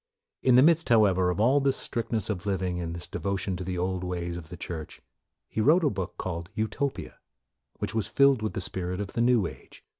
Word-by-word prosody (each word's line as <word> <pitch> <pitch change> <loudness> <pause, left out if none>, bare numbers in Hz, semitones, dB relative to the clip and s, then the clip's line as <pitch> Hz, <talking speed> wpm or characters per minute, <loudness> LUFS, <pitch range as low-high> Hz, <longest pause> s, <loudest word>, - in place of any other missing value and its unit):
In 130 -2 +4
the 130 - +8
midst, 165 -1 +4
however, 95 -6 +4
of 90 - -2
all 130 +6 +4
this 135 -1 +1
strict 115 -1 -3
ness 110 -4 0
of 100 -1 -5
living 90 -2 -1
and 85 -1 -4
this 85 0 -6
devotion 100 0 -2
to 90 - -5
the 90 0 -3
old 90 +1 -1
ways 85 -1 -3
of 85 -3 -8
the 90 - -8
Church, 80 -2 -6 0.5
he 110 - -2
wrote 160 +9 +5
a 145 - +3
book 95 -2 -5
called 85 -2 -4
" - - -38
Utopia," 120 +5 -3 0.6
which - - -3
was 110 -2 0
filled 140 -4 +4
with 110 - -2
the 95 - -3
spirit 90 0 -2
of 100 -1 -5
the 115 - 0
new 120 -4 +4
age. - - -10
95 Hz, 230 wpm, -27 LUFS, 90-120 Hz, 0.6 s, the